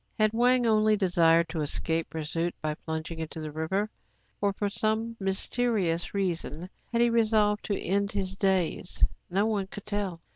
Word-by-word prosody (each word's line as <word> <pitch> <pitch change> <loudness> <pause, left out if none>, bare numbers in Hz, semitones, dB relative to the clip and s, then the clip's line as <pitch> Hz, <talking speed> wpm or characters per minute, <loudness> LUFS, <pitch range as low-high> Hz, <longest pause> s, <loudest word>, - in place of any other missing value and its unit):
Had 215 -1 +3
Wang 245 +1 +4
only 215 -1 +4
desired 170 -3 +4
to 160 -1 -2
escape 160 +2 -1
pursuit 165 +2 -2
by 155 -1 -2
plunging 160 +1 -5
into 160 0 -5
the 155 -1 -4
rîver, 160 +7 -1 0.5
or, 200 0 +3
for 205 +1 -2
some 220 +3 -1
mysterious 195 -2 0
reason, 180 -2 -2 0.2
had 235 0 +2
he 240 - +4
resolved 215 -2 +3
to 200 - -1
end 200 +2 0
his 190 -2 -2
days.^ 190 -2 +1 0.2
no 195 +4 +2
one 205 -3 0
could 205 +1 -9
tell. 205 -5 -2
195 Hz, 160 wpm, -28 LUFS, 165-215 Hz, 0.5 s, Wang